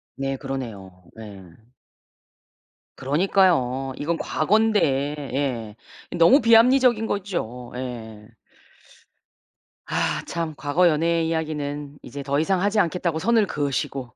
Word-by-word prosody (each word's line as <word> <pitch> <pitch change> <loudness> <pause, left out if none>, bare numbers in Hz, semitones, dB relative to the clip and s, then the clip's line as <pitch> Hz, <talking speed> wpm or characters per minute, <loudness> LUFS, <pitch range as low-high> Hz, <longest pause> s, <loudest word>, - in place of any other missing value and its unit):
네 135 0 -3
그러네요. 120 -9 -6 0.3
예. 100 -3 -10 1.5
그러니까요. 135 -4 +1
이거는 165 +3 -2
과거인데. 215 +6 +1 0.5
예. 120 -6 -3 0.4
너무 175 - +6
비합리적인 230 0 +5
거죠. 170 - -4
예. 110 -4 -7 1.6
아 - - -1
참 165 -2 -4
과거 160 +5 +2
연애의 165 +1 +1
이야기는 150 -3 -4
이제 140 +3 -8
더 140 +2 0
이상 185 +3 +1
하지 205 +1 +2
않겠다고 170 -2 -1
선을 225 +2 +2
그으시고 135 -4 -3
150 Hz, 240 characters per minute, -23 LUFS, 130-185 Hz, 1.6 s, 너무